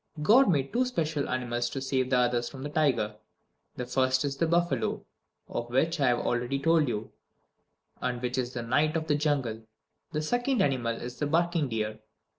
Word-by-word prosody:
God 235 - +6
made 140 -6 +1
two 250 - +3
special 160 - -1
animals 120 -1 -1
to 135 - -4
save 130 -1 0
the 130 - +3
others 120 -1 +1
from 130 +1 -9
the 145 - -4
tiger. 125 -9 +1 0.6
The 125 - -4
first 130 +2 +1
is 140 -1 -2
the 165 - +1
buffalo, 175 +1 0 0.4
of 120 0 -4
which 160 +7 +1
I 140 - +3
have 120 -1 +2
already 120 +3 0
told 160 +1 +3
you, 110 -2 -3 0.9
and 125 -1 -1
which 125 +1 -2
is 125 0 -3
the 120 - -4
Knight 150 +7 +2
of 160 - -3
the 155 - +1
Jungle. 145 -7 0 0.5
The 150 0 -2
second 245 - 0
animal 120 -6 0
is 125 +1 -7
the 145 - 0
barking 165 -1 +1
deer. 110 -1 -2
135 Hz, 190 wpm, -28 LUFS, 120-155 Hz, 0.9 s, God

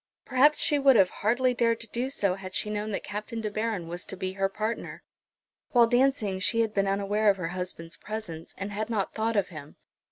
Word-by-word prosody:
Perhaps 280 +4 +4
she 295 - +2
would 270 -3 +6
hardly 225 +6 +3
have 245 - -6
dared 230 -1 +2
to 230 - -6
do 245 +4 -1
so 200 -8 +1
had 190 0 -7
she 210 - 0
known 210 0 -2
that 200 - -3
Captain 210 +3 -5
De 215 -1 -3
Baron 215 -5 -2
was 175 +1 -5
to 190 - -7
be 185 0 -2
her 195 0 0
partner. 215 +3 -4 0.7
While 240 -2 +7
dancing 245 -5 +2
she 230 +5 +2
had 220 -2 0
been 195 -1 +1
unaware 200 +2 +2
of 195 - +3
her 175 -3 -3
husband's 175 -2 -4
presence, 190 -7 -7
and 200 +1 -4
had 215 +2 -3
not 210 -4 -1
thought 225 +1 -1
of 200 -2 +1
him. 155 -4 -10
210 Hz, 220 wpm, -28 LUFS, 190-230 Hz, 0.7 s, While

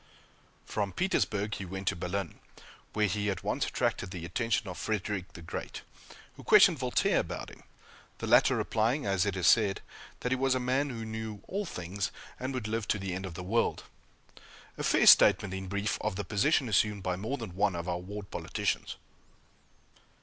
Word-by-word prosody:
From 100 -3 -2
Petersburg 105 - 0
he 100 - -4
went 95 +1 -6
to - - -3
Berlin, 90 0 -4 0.5
where 105 -1 +2
he 105 +1 0
at 100 0 -3
once 105 +7 -1
attracted 120 -6 -1
the 90 -3 -6
attention 110 +4 -1
of 90 - -6
Frederick 105 -3 -3
the 85 - -10
Great, - - -6 0.5
who - - -13
questioned - - +6
Voltaire - - +2
about - - -5
him; - - -15 0.6
the - - -5
latter - - +5
replying, 115 +6 0
as 95 0 +1
it 100 - -1
is 90 - -1
said, 100 +2 +4 0.4
that 125 - -2
he - - +4
was 130 0 +1
a - - +1
man 130 +3 0
who 115 -3 -5
knew 110 -1 -6
all 200 +2 -2
things, 90 - -4 0.3
and 130 +1 -3
would 125 -5 -3
live 110 0 -2
to - - +1
the 95 -2 -4
end 95 +1 -4
of 85 - -9
the 90 - -6
world 115 +6 0 0.9
a - - -6
fair - - +3
statement, 95 -2 +7
in 95 0 -5
brief, 100 +3 -1
of 105 -2 -1
the 105 - -4
position 130 +6 +2
assumed 105 -1 +1
by 90 -1 0
more 110 +9 -3
than 110 -8 -7
one 100 -1 +1
of 85 +1 -4
our 90 -1 -1
ward 100 +2 -8
politicians! - - -2
105 Hz, 190 wpm, -30 LUFS, 95-115 Hz, 0.9 s, statement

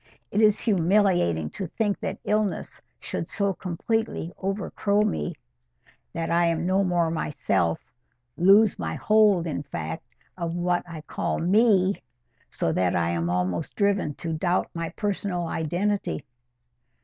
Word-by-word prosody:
It 210 - +2
is 210 -1 +5
humiliating 175 - +2
to 190 - -5
think 205 +3 -1
that 190 - -3
illness 210 -2 -1 0.2
should - - -4
so 200 -1 0
completely 185 0 -2
'overcrow' 200 +1 0
me, 185 - -2 0.8
that 165 -1 -3
I 170 0 +3
am 165 0 0
no 190 +2 +2
more 175 -3 +1
myself—lose 125 - +1
my - - -3
hold, 210 -5 +4
in 155 -4 -2
fact, 80 - -5 0.3
of 170 -2 -3
what 175 0 0
I 160 -2 -7
call - - -2
ME—so 180 - 0
that 90 +2 +1
I 85 -1 +1
am 85 0 -1
almost 90 0 -1
driven 200 -8 +1
to 165 -1 -4
doubt 175 +3 0
my 165 -1 -3
personal 200 -4 -2
identity." 175 +5 -1
175 Hz, 130 wpm, -25 LUFS, 145-200 Hz, 0.8 s, is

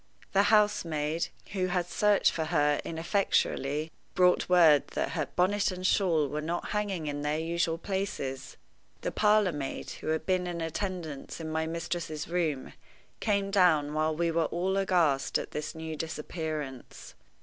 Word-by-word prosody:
The 200 +1 +4
housemaid, 165 -7 +2 0.2
who 185 -2 0
had 180 -1 0
searched 205 +3 +3
for 160 - -2
her 150 -3 +2
ineffectually, 160 -4 0 0.2
brought 180 -1 +3
word 165 -5 +6
that - - -1
her - - -2
bonnet 200 +3 +1
and 185 -1 -5
shawl 170 -7 +3
were 150 +2 -3
not 170 +3 -3
hanging 205 -6 -2
in 145 -1 -3
their 150 +1 0
usual 165 0 0
places. 180 -8 -4 0.4
The - - -2
parlor 210 -3 +3
maid, 145 -3 -5
who - - -7
had 160 0 0
been 185 -1 +1
in 175 -1 -4
attendance 165 -3 -4
in 160 -1 -5
my 160 0 -1
mistress's 165 -2 -4
room, 165 -6 -1 0.5
came 200 -2 0
down 160 -7 +4
while 155 0 +1
we 170 +1 +1
were 165 0 +1
all 180 +4 -1
aghast 175 -8 +2
at - - -6
this 150 +2 -4
new 160 0 -5
disappearance. 155 -4 -5
165 Hz, 155 wpm, -29 LUFS, 155-185 Hz, 0.5 s, word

